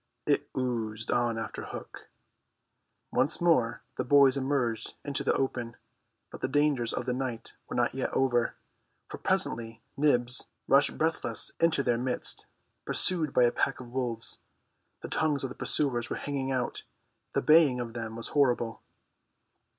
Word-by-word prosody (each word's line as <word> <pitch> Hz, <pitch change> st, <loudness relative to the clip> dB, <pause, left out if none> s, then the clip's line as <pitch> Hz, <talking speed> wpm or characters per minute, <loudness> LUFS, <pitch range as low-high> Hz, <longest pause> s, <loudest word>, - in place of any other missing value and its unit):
It -, -, +1 dB
oozed 115 Hz, -4 st, -2 dB
on 120 Hz, -2 st, +1 dB
after 115 Hz, -, -5 dB
Hook. -, -, -9 dB, 1.0 s
Once 145 Hz, +4 st, +3 dB
more 160 Hz, -10 st, +2 dB
the -, -, 0 dB
boys 140 Hz, 0 st, +5 dB
emerged 130 Hz, -5 st, -1 dB
into 145 Hz, -1 st, 0 dB
the -, -, +2 dB
open; 120 Hz, -3 st, -2 dB, 0.5 s
but -, -, -10 dB
the -, -, 0 dB
dangers 140 Hz, -4 st, +1 dB
of 125 Hz, -, -3 dB
the 125 Hz, -, -1 dB
night 125 Hz, -3 st, -4 dB, 0.2 s
were -, -, -5 dB
not 120 Hz, -1 st, +1 dB
yet 130 Hz, 0 st, -2 dB
over, 120 Hz, -3 st, +1 dB, 0.5 s
for -, -, -7 dB
presently 115 Hz, -1 st, 0 dB
Nibs 125 Hz, -4 st, +2 dB, 0.2 s
rushed 140 Hz, +1 st, +3 dB
breathless 160 Hz, +1 st, +1 dB
into 165 Hz, -4 st, +3 dB
their 120 Hz, -2 st, +1 dB
midst, 125 Hz, 0 st, -1 dB, 0.4 s
pursued 165 Hz, -5 st, +4 dB
by 125 Hz, -, +4 dB
a 120 Hz, -, +4 dB
pack 135 Hz, -, -1 dB
of 125 Hz, -2 st, -10 dB
wolves. 120 Hz, -3 st, -1 dB, 0.6 s
The -, -, -6 dB
tongues 150 Hz, -3 st, 0 dB
of 135 Hz, -, -2 dB
the -, -, -9 dB
pursuers 120 Hz, -6 st, 0 dB
were -, -, -2 dB
hanging 135 Hz, -2 st, -3 dB
out; 125 Hz, -2 st, -2 dB, 0.5 s
the -, -, 0 dB
baying 150 Hz, -5 st, +5 dB
of 120 Hz, -2 st, -5 dB
them 115 Hz, -2 st, -5 dB
was 115 Hz, -, -5 dB
horrible. 120 Hz, -5 st, +1 dB
125 Hz, 155 wpm, -29 LUFS, 120-140 Hz, 1.0 s, boys